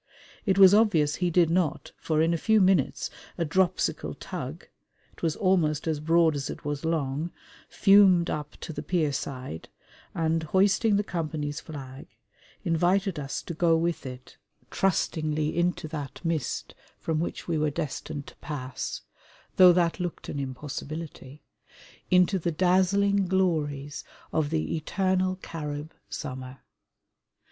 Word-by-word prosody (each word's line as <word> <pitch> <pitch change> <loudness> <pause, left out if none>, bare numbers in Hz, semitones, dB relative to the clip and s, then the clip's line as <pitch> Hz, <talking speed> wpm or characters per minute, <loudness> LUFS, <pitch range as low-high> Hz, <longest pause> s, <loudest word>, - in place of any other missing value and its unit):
It 190 -1 +3
was 195 -1 +9
obvious 170 -9 +3
he 180 -1 +1
did 170 -1 +3
not, 170 -3 0
for 155 -1 0
in 165 +1 +2
a - - +1
few 220 +3 +4
minutes 185 -7 +2 0.3
a 170 - 0
dropsical 185 +3 0
tug - - -6 0.5
it - - -19
was 165 -2 0
almost 165 -6 +1
as 155 -2 0
broad 165 0 +3
as 140 -1 -3
it - - -7
was 145 0 -3
long 155 -1 -1 0.4
fumed 195 -4 +5
up 150 -1 -4
to 160 - -6
the - - -5
pierside 140 - -2 0.5
and, 165 0 +1
hoisting 195 +6 +3
the 205 - +2
company's 155 -5 -3
flag, 140 -4 -9 0.6
invited 180 +2 +1
us 140 -1 -4
to 170 - -5
go 165 0 +3
with 165 -3 -1
it 125 0 -10 0.3
trustingly 155 -5 0
into 175 -2 0
that 145 -4 -6
mist 165 -6 -2 0.2
from 160 -1 -2
which 170 - -4
we 165 -3 0
were 150 0 +2
destined 145 -1 -4
to - - -13
pass 135 -4 -5 0.6
though 185 -1 +9
that 170 -1 +1
looked 175 -2 -4
an 145 - -3
impossibility 145 +1 -6 0.7
into 180 +1 +4
the 170 - -1
dazzling 190 +3 +3
glories 150 -6 0 0.3
of 155 -2 +1
the 160 +1 -1
Eternal 185 +3 0
Carib 150 -1 -5 0.2
summer. 130 -2 -6
165 Hz, 140 wpm, -27 LUFS, 150-180 Hz, 0.7 s, was